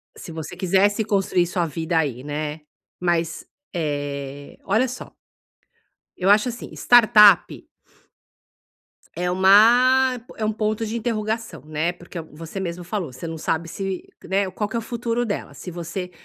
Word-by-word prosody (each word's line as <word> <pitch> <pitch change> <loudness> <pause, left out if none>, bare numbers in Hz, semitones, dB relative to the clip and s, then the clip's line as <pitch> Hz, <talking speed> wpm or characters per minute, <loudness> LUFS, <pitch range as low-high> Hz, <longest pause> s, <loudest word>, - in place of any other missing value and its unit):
Se - - -9
você 160 +1 -7
quisesse 195 +3 +2
construir 195 -4 +1
sua 175 0 -1
vida 165 +1 -2
aí, 135 -6 -1
né, 150 +1 -4 0.4
mas, 170 -2 -1 0.3
eh, 145 -3 -4
olha 220 +6 +2
só, 250 0 -8 1.1
eu 185 +2 +1
acho, 210 +4 +5
assim, 235 0 -7
startup 220 -5 +5 1.5
é 180 +2 -1
uma 245 +7 +5 0.2
é 220 - -1
um 215 - +1
ponto 215 +1 -1
de 220 - -4
interrogação, 225 -1 -3
né, 155 +3 -1
porque 175 0 -9
você 160 +4 -9
mesmo 175 -1 -4
falou, 175 -6 -4
você 130 +7 -8
não 160 - -5
sabe 165 +1 -2
se, 195 +1 -4 0.2
né, 195 0 0
qual 210 +2 -2
que - - -6
é - - +1
o - - -5
futuro 235 +1 -2
dela, 205 - -4
se 180 - -8
você 175 +2 -5
185 Hz, 150 wpm, -23 LUFS, 165-215 Hz, 1.5 s, acho